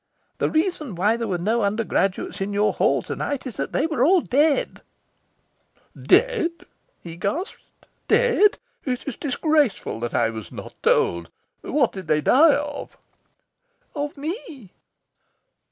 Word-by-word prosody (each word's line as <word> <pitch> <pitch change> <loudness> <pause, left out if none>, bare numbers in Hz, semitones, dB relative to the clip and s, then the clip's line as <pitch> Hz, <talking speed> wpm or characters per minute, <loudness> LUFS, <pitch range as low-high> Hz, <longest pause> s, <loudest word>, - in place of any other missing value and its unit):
The - - +1
reason 315 - -1
why 205 +6 +2
there 230 -1 -3
were 185 -3 -1
no 220 +7 0
undergraduates 200 -2 -1
in 200 +1 -2
your 205 +1 +2
Hall - - +1
to - - -5
night 285 -2 -3
is 255 - -7
that - - -3
they - - +1
were 305 -7 0
all 355 +5 +5
dead." 290 +2 +1 1.1
"Dead?" 475 -9 +3 0.5
he 165 -1 -8
gasped. 290 - -3 0.5
"Dead? 470 -4 +4 0.3
It 250 -1 -3
is 270 - -3
disgraceful 290 - 0
that 120 0 -4
I 115 -1 +2
was 110 -2 -8
not - - -9
told. 85 -1 +1 0.3
What 270 -4 +1
did 190 -4 -8
they 155 -1 +2
die 290 - +5
of?" 290 0 -5 1.0
"Of 290 0 -4
me." 290 - -7
255 Hz, 140 wpm, -23 LUFS, 195-310 Hz, 1.1 s, all